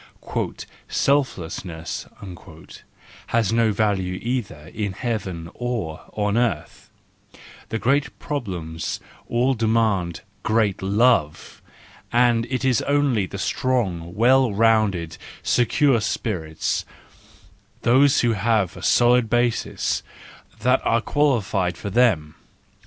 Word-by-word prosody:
" - - -14
Selflessness 90 - -1 1.2
has 115 -2 +1
no 115 -1 +3
value 95 -3 0
either 110 - -4
in 105 -3 -3
heaven 95 -7 -4
or 115 -11 -4
on 105 0 0
earth; 120 -1 -2 0.8
the 115 - -2
great 135 +5 0
problems 90 - -4 0.3
all 125 +3 +2
demand 110 -7 0 0.2
great 110 -3 +1
love, 100 -5 +1 0.5
and 120 -1 +3
it 130 0 -2
is 125 -4 +3
only 140 -9 +1
the 100 - -7
strong, 95 -7 -1
well 125 +2 +4
rounded, 100 -6 +1 0.2
secure 125 0 +3
spirits, 85 -8 -2 1.0
those 135 +3 +4
who 120 -1 +2
have 105 -3 +1
a - - -10
solid 120 -1 +4
basis, 120 0 0 0.6
that 125 +1 +2
are 115 0 +2
qualified 110 - 0
for 100 - -5
them. 95 -10 +2
110 Hz, 100 wpm, -23 LUFS, 95-125 Hz, 1.2 s, well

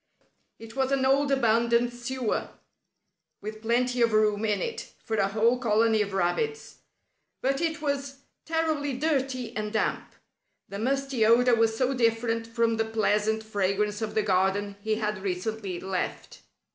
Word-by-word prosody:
It 225 +1 -12
was 265 0 0
an 270 -1 +2
old 275 +1 +3
abandoned 235 -1 +2
sewer, 240 -1 -2 0.9
with 215 +1 -7
plenty 245 +2 +1
of 230 -1 +3
room 215 0 +2
in 210 -2 +1
it 460 - -5
for 220 - -2
a 195 - +3
whole 225 +5 +2
colony 225 -2 +3
of 200 -1 -2
rabbits, 435 - -1 0.6
but 270 +3 0
it 325 -1 -2
was 280 -1 -2 0.3
terribly 315 -3 -1
dirty 265 -4 -1
and 210 -1 -3
damp. 220 - -1 0.6
The 200 - -6
musty 270 0 0
odor 240 +3 +5
was 225 -1 +2
so 260 +2 +1
different 230 -1 0
from 230 -1 +1
the 225 - +1
pleasant 220 0 +1
fragrance 205 0 -1
of 220 -1 -3
the 215 - +2
garden 200 +1 +1
he 215 +1 0
had 210 -2 -2
recently 195 0 -3
left. 190 0 -4
225 Hz, 150 wpm, -27 LUFS, 210-260 Hz, 0.9 s, odor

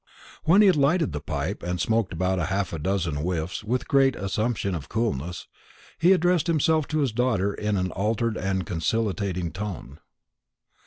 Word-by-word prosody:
When 185 +6 +6
he - - +6
had 185 -5 +5
lighted 145 - +2
the 75 -1 -4
pipe, - - -3
and 90 +1 -3
smoked 110 -3 +1
about 95 +2 0
half 95 +2 -1
a 80 - -3
dozen 85 -2 -1
whiffs 85 +4 -3
with 120 +3 -1
a - - -20
great 135 -2 +3
assumption 100 0 -1
of 80 -5 -5
coolness, 90 - -2 0.5
he 175 +4 +5
addressed 180 -2 +3
himself 160 -1 +2
to 155 -1 0
his 135 -4 +1
daughter 110 -4 +1
in 105 0 -1
an 95 -1 -1
altered 110 +3 -1
and 95 -1 -1
conciliating 90 -1 -1
tone. 90 -8 -6
100 Hz, 170 wpm, -25 LUFS, 90-125 Hz, 0.5 s, When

